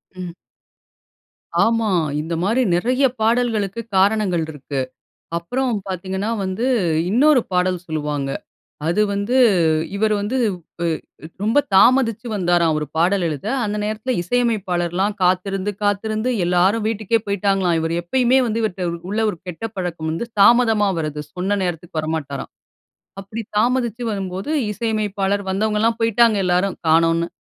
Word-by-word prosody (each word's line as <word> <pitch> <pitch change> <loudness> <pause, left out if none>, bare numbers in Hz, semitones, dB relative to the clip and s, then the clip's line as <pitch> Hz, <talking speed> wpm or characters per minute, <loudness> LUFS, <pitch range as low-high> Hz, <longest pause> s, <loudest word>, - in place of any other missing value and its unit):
ம். 180 -2 -6 1.3
ஆமா. 230 -1 +1 0.3
இந்த 160 +2 -4
மாரி 225 +7 +2
நெறைய 255 +9 +2 0.2
பாடல்களுக்கு 225 -2 +1 0.2
காரணங்கள் 195 -3 +2
இருக்கு. 145 -1 -5 0.6
அப்புறம் 250 +9 -1
பாத்தீங்கன்னா 190 +2 -3
வந்து, 190 +5 -2 0.4
இன்னொரு 265 +5 +4
பாடல் 180 -1 0
சொல்லுவாங்க. 150 -3 -2 0.6
அது 175 +6 +2
வந்து 200 +5 -1 0.6
இவர் 215 +1 +1
வந்து 210 +6 -2 0.4
வு 170 - -2
அ - - +2 0.6
ரொம்ப 225 +6 +2 0.2
தாமதிச்சு 230 +2 +4
வந்தாராம், 175 -4 +2
ஒரு 150 - -2
பாடல் 180 +4 +2
எழுத. 150 +3 -4 0.2
அந்த 210 0 -2
நேரத்துல 215 +4 -2
இசையமைப்பாளர்லாம் 190 -3 0
காத்திருந்து 185 +2 +1
காத்திருந்து 215 +3 0 0.2
எல்லாரும் 185 +5 +2
வீட்டுக்கே 225 0 0
போய்ட்டாங்களாம். 195 -3 +1
இவரு 165 +1 -1
எப்பயுமே 250 +8 +2
வந்து, 225 0 -1
இவர்ட்ட 185 -4 -2 0.2
உள்ள 210 +2 -1
ஒரு 175 - -5
கெட்ட 180 +5 -5
பழக்கம் 175 -3 -3
வந்து, 165 +9 -3 0.2
தாமதமா 225 -2 +5
வரது. 150 -1 -3
சொன்ன 190 +3 0
நேரத்துக்கு 175 -1 -3
வரமாட்டாராம். 155 -3 -4 0.7
அப்பிடி 215 +4 -6
தாமதிச்சு 240 0 +1
வரும்போது, 195 +3 -4 0.2
இசையமைப்பாளர் 205 -2 -1
வந்தவங்கலாம் 215 +3 +1
போய்ட்டாங்க 230 -1 +4
எல்லாரும் 180 +2 +1
காணோன்னு! 165 +1 +3
200 Hz, 125 wpm, -20 LUFS, 175-225 Hz, 1.3 s, தாமதமா